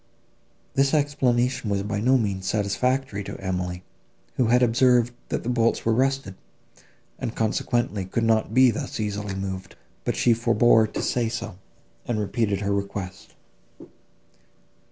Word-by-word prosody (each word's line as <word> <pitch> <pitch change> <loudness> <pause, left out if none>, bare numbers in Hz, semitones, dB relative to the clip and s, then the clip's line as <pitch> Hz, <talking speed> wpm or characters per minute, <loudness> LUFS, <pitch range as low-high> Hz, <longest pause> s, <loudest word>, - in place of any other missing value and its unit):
This 135 +2 +2
explanation 125 -5 +1
was 100 -1 0
by 105 0 -2
no 130 +5 +4
means 100 -5 -2
satisfactory 110 +3 0
to - - -7
Emily, 90 -1 -3 0.5
who 125 - +1
had 125 +2 +4
observed, 120 0 +3 0.2
that - - -2
the - - -6
bolts 115 -2 +1
were 115 - +3
rusted, 135 -3 0 0.9
and 115 - -4
consequently 110 -2 -1
could 115 +5 -2
not 110 -1 +2
be 130 +1 +5
thus 110 - -5
easily 105 -2 -3
moved; 95 -1 -5 0.3
but - - -1
she 120 - +4
forbore 115 -1 +4
to - - -4
say 120 -2 0
so, 110 -5 -6 0.5
and 115 -3 -1
repeated 105 -1 -1
her 100 0 0
request. 100 -1 -5
110 Hz, 140 wpm, -24 LUFS, 100-125 Hz, 0.9 s, be